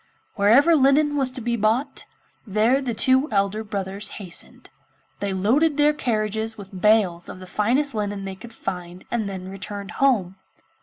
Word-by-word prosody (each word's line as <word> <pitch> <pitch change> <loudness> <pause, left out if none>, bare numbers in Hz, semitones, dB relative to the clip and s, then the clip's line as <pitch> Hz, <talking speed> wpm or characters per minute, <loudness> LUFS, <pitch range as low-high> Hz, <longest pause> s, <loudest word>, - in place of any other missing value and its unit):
Wherever 245 +11 +5
linen 290 +1 +3
was 270 -3 +2
to 255 0 -6
be 235 +1 -1
bought, 225 +5 0 0.4
there 220 +7 +2
the 245 -4 -3
two 260 +5 +3
elder 200 +1 0
brothers 200 0 -4
hastened. 185 -5 -6 0.5
They 200 -1 -2
loaded 265 +12 +2
their 295 0 +4
carriages 220 -4 -2
with 195 -2 -10
bales 200 -6 +3
of - - -8
the 185 - -10
finest 245 +9 0
linen 205 -2 -3
they 195 - -5
could 230 +5 -12
find 180 -3 -6
and 220 -4 -1
then 185 -1 -6
returned 200 +1 -6
home. 200 -9 +2
215 Hz, 160 wpm, -23 LUFS, 195-260 Hz, 0.5 s, Wherever